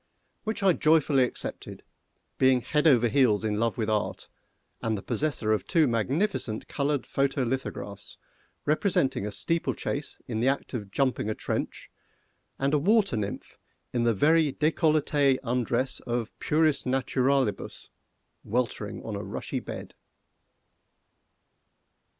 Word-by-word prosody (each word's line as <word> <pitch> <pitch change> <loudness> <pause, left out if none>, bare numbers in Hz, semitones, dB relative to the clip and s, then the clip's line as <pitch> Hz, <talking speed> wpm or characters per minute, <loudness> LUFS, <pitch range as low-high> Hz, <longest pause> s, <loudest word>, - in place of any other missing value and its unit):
Which 220 -1 -2
I 190 -2 +5
joyfully 155 -5 +4
accepted, - - -6 0.6
being 130 -1 +4
head 150 +5 +1
over 120 -5 +5
heels 120 -4 +3
in 105 -1 0
love 115 -1 0
with 110 -2 -1
Art, 105 -1 -2 0.5
and 110 -1 -1
the 95 - -8
possessor 135 -8 0
of 110 - -2
two 165 -4 +4
magnificent 120 - -1
coloured 145 -1 -1
photo 135 -1 0
lithographs, 115 -5 -5 0.5
representing 150 - +1
a - - -4
steeplechase 160 0 -2
in 115 -4 -2
the 120 - +2
act 140 +1 -1
of 105 -5 -4
jumping 130 -1 0
a 110 - -1
trench, - - -4 0.7
and 140 +2 0
a 150 - +4
water 200 - +3
nymph 100 -2 -5 0.3
in 120 - +1
the 115 -2 +2
very 155 +5 +4
décolleté 150 -3 +2
undress 125 +1 -1
of 120 -2 -3
"puris 155 -1 +2
naturalibus," 130 -2 0 0.5
weltering 120 +2 -2
on - - -5
a - - -4
rushy - - -4
bed. - - -8
130 Hz, 130 wpm, -27 LUFS, 115-150 Hz, 0.7 s, I